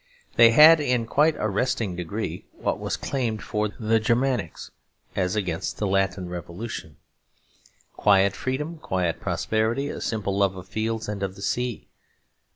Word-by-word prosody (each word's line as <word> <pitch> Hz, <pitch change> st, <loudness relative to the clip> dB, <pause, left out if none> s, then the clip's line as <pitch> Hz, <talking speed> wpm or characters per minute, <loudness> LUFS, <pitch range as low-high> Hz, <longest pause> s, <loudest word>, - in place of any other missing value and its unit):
They 115 Hz, -, +8 dB
had 155 Hz, +7 st, +8 dB
in 125 Hz, -5 st, +1 dB
a -, -, -7 dB
quite 150 Hz, +6 st, +3 dB
arresting 105 Hz, -2 st, -1 dB
degree 85 Hz, -2 st, -5 dB
what -, -, -2 dB
was -, -, -2 dB
claimed 120 Hz, -6 st, -2 dB
for 105 Hz, 0 st, -1 dB
the 110 Hz, +2 st, 0 dB
Germanics 120 Hz, -4 st, -1 dB, 0.4 s
as 90 Hz, 0 st, 0 dB
against 90 Hz, -6 st, -2 dB
Latin 95 Hz, -2 st, 0 dB
revolutionism: 90 Hz, +5 st, -7 dB, 1.0 s
quiet 100 Hz, -1 st, +4 dB
freedom, 150 Hz, +6 st, -3 dB
quiet 90 Hz, -, -1 dB
prosperity, 115 Hz, +6 st, -1 dB
a -, -, -6 dB
simple 100 Hz, -3 st, -2 dB
love 100 Hz, -1 st, +2 dB
of 90 Hz, -, -9 dB
fields 110 Hz, +1 st, -2 dB
and 105 Hz, -2 st, -4 dB
of 95 Hz, -1 st, -3 dB
the 100 Hz, -, -9 dB
sea. 125 Hz, +3 st, -2 dB
110 Hz, 145 wpm, -25 LUFS, 95-125 Hz, 1.0 s, They